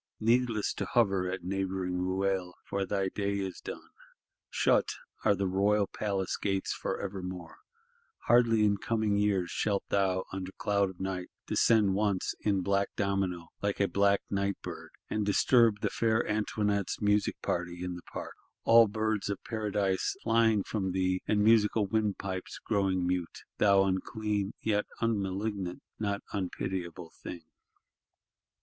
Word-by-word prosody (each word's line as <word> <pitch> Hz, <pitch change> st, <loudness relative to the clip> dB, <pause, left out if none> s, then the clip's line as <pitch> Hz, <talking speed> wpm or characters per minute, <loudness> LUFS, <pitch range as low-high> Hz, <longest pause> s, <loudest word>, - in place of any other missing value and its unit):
Needless 115 Hz, -1 st, +2 dB
to -, -, -1 dB
hover 100 Hz, -6 st, +2 dB
at 95 Hz, -1 st, -4 dB
neighbouring 95 Hz, -1 st, -2 dB
Ruel; 95 Hz, 0 st, -1 dB
for 100 Hz, -1 st, -2 dB
thy 95 Hz, 0 st, 0 dB
day 100 Hz, 0 st, -1 dB
is 95 Hz, -2 st, -4 dB
done. -, -, -8 dB, 0.6 s
Shut -, -, +2 dB, 0.3 s
are 100 Hz, -, +4 dB
the 100 Hz, +1 st, -1 dB
royal 100 Hz, +2 st, +2 dB
palace 95 Hz, -3 st, -2 dB
gates 95 Hz, -1 st, -1 dB
for -, -, -3 dB
evermore; 90 Hz, -4 st, -6 dB, 0.7 s
hardly 115 Hz, -2 st, +5 dB
in 100 Hz, -1 st, +3 dB
coming 110 Hz, 0 st, 0 dB
years 100 Hz, -4 st, +1 dB
shalt 100 Hz, -2 st, 0 dB
thou, 95 Hz, -2 st, +1 dB
under 95 Hz, -1 st, -4 dB
cloud 100 Hz, -1 st, +1 dB
of 95 Hz, -, -12 dB
night, 95 Hz, -1 st, -3 dB, 0.2 s
descend 105 Hz, -4 st, +3 dB
once, 100 Hz, -2 st, 0 dB
in 100 Hz, -3 st, +1 dB
black 100 Hz, +1 st, +1 dB
domino, 95 Hz, -4 st, -1 dB
like 100 Hz, -1 st, -1 dB
a 100 Hz, -, +3 dB
black 100 Hz, 0 st, +3 dB
night 100 Hz, 0 st, -1 dB
bird, -, -, -7 dB, 0.2 s
and 105 Hz, -, -1 dB
disturb 110 Hz, +1 st, +4 dB
the -, -, 0 dB
fair 115 Hz, 0 st, +1 dB
Antoinette's 105 Hz, -2 st, 0 dB
music 105 Hz, 0 st, +1 dB
party 90 Hz, 0 st, -2 dB
in 90 Hz, 0 st, -3 dB
the 90 Hz, -, -8 dB
Park: -, -, -6 dB, 0.3 s
all 115 Hz, 0 st, +7 dB
Birds 110 Hz, -1 st, -1 dB
of 100 Hz, -, -4 dB
Paradise 105 Hz, -4 st, -1 dB
flying 115 Hz, -2 st, +3 dB
from 95 Hz, -4 st, -2 dB
thee, 95 Hz, 0 st, +1 dB
and 105 Hz, -1 st, +2 dB
musical 110 Hz, -1 st, +4 dB
windpipes 100 Hz, -3 st, -2 dB
growing 95 Hz, -4 st, +1 dB
mute. 90 Hz, -1 st, -2 dB, 0.2 s
Thou 100 Hz, -1 st, +5 dB
unclean, 100 Hz, +2 st, -1 dB
yet 105 Hz, -2 st, +1 dB
unmalignant, 100 Hz, -3 st, -2 dB, 0.2 s
not 100 Hz, -2 st, -2 dB
unpitiable 90 Hz, -3 st, -4 dB
thing! 85 Hz, -2 st, -7 dB
100 Hz, 145 wpm, -30 LUFS, 95-105 Hz, 0.7 s, all